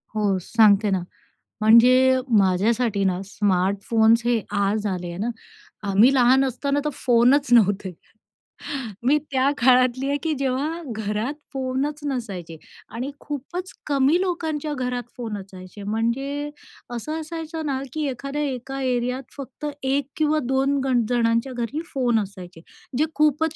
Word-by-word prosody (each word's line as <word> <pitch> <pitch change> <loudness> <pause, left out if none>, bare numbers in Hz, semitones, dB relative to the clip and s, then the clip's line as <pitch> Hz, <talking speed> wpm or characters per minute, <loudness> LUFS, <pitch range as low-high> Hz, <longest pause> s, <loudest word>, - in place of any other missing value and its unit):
हो, 205 -3 +1
सांगते 210 0 +4
ना, 185 -2 0 0.6
म्हणजे 255 +4 +6 0.2
माझ्यासाठी 200 +3 +2
ना, 185 -1 0
स्मार्टफोन्स 205 +4 +2
हे 240 -2 +2 0.2
आज 205 +2 0
आले 180 -3 -3
आहे 170 0 -7
ना. 225 +5 -1 0.6
आम्ही 210 +7 +5
लहान 260 +1 +5
असताना 280 +2 -1
तर 300 - 0
फोनच 250 +4 +3
नव्हते. 205 -4 +3 1.1
मी 285 +4 +4
त्या 265 +1 +2
काळातली 255 0 +3
आहे, 285 - +1
की 320 -1 0
जेव्हा 275 +5 -1
घरात 215 +4 -2 0.2
फोनच 270 +3 -2
नसायचे 195 - -5 0.3
आणि 250 +5 -5
खूपच 325 +6 -6
कमी 285 +4 +3
लोकांच्या 320 -5 -2
घरात 250 -2 -2
फोन 225 -4 -4
असायचे. 190 +1 -11
म्हणजे 265 +7 -2 0.5
असं 305 +7 -4
असायचं 320 0 -6
ना, 270 -2 -1
की 310 -1 -2
एखाद्या 275 +3 -4
एका 270 0 -4
एरियात 250 0 -1
फक्त 275 +1 -8 0.2
1 270 0 0
किंवा 310 0 +2
2 270 +2 +1
गण 245 -4 +2
जणांच्या 235 +1 +1
घरी 245 +5 -3
फोन 245 -4 +2
असायचे, 185 -4 -8 0.4
जे 305 - +3
खूपच 305 +1 +2
250 Hz, 135 wpm, -23 LUFS, 215-280 Hz, 1.1 s, म्हणजे